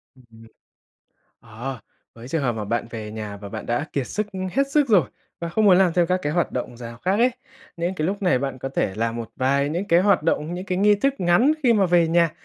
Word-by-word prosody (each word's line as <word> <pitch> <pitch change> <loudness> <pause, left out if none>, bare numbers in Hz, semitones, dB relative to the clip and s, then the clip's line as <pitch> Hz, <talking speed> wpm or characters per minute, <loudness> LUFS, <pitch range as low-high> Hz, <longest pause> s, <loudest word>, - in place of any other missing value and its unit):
Ưm, 130 - -20
ừm. 115 0 -16 0.9
Ờ, 120 +3 -7 0.4
với 115 +2 -11
trường 160 0 -1
hợp 125 - +1
mà 110 -2 -4
bạn 115 +3 -2
về 110 -2 -6
nhà 105 -2 -6
và 100 0 -9
bạn - - -7
đã 120 +6 -1
kiệt 135 -3 -1
sức, 210 0 -2
ưm, 185 -1 -4
hết 275 0 +1
sức 290 -1 +2
rồi, 190 - +4 0.3
và 170 - -3
không 215 +6 +1
muốn 190 -3 +6
làm 185 -3 +4
thêm 175 -1 +2
các 185 +1 +1
cái 145 - -1
hoạt 175 -3 0
động 120 -1 -4
rào 115 -1 -9
khác 190 +7 0
ấy, 250 +2 +4 0.5
nên 175 +2 -2
cái 155 -3 -1
lúc 200 +1 -3
này 180 -9 +3
bạn 135 -1 -4
có 135 - -4
thể 100 -7 -1
làm 115 +2 -2
một 115 -2 -6
vài 140 +2 +1
những 175 +6 -2
cái 170 -1 +5
hoạt 195 -4 +3
động, 155 +2 -1
những 180 - -5
cái 185 -1 -1
nghi 210 +1 +5
thức 270 +7 0
ngắn 180 - +4
khi 240 -3 +5
mà 200 -4 +3
về 170 -1 +3
nhà 170 -1 +3
165 Hz, 260 wpm, -23 LUFS, 120-185 Hz, 0.9 s, muốn